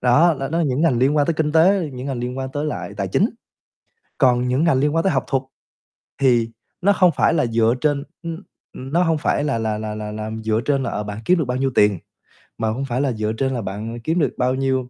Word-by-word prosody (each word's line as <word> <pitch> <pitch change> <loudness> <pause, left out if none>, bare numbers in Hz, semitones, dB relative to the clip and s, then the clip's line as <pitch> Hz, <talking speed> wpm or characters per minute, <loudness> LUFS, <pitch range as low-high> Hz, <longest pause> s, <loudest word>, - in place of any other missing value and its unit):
đó, 150 +7 +4
đó 135 - -2
đó 165 +3 0
những 140 -3 0
ngành 135 -8 +3
liên 135 +4 +2
quan 145 -1 +3
tới 165 - +1
kinh 150 -1 0
tế, 170 -1 +3
những 125 +2 -6
ngành 135 -3 -3
liên 125 +2 -4
quan 130 0 -3
tới 145 0 -2
lại 150 -8 -5
tài 100 -2 -2
chính. 200 - +2 0.9
Còn 125 -2 +3
những 130 +4 +1
ngành 165 -6 +3
liên 150 +3 +1
quan 165 - +2
tới 190 - +2
học 135 - 0
thuật 135 -1 0 0.8
thì 120 -4 +3 0.3
nó 200 +2 +4
không 180 -3 +4
phải - - +3
là 150 -6 +2
dựa 115 0 +2
trên 145 -2 +1 0.2
ưm, 165 +3 -6 0.3
ừm, 135 +3 -8
nó 175 +1 +4
hông 165 -2 +1
phải 150 - 0
là 140 -5 0
là 110 -1 -1
là 105 0 -4
là 105 0 -5
là 110 +1 -5
dựa 110 +1 +1
trên 140 -2 +1
là, - - -2
ờ, 105 - -3
bạn 105 0 -6
kiếm 180 - +4
được 155 - 0
bao 125 +1 -2
nhiêu 135 0 0
tiền, 105 -4 +4 0.6
mà 110 -1 -1
hông 125 +5 -2
phải 125 0 -1
là 140 -3 +1
dựa 110 0 -2
trên 135 +3 -1
là 120 - -2
bạn 105 +4 -5
kiếm 160 +8 0
được 150 - +1
bao 125 +1 +1
nhiêu, 130 -1 -1
130 Hz, 260 wpm, -21 LUFS, 115-150 Hz, 0.9 s, đó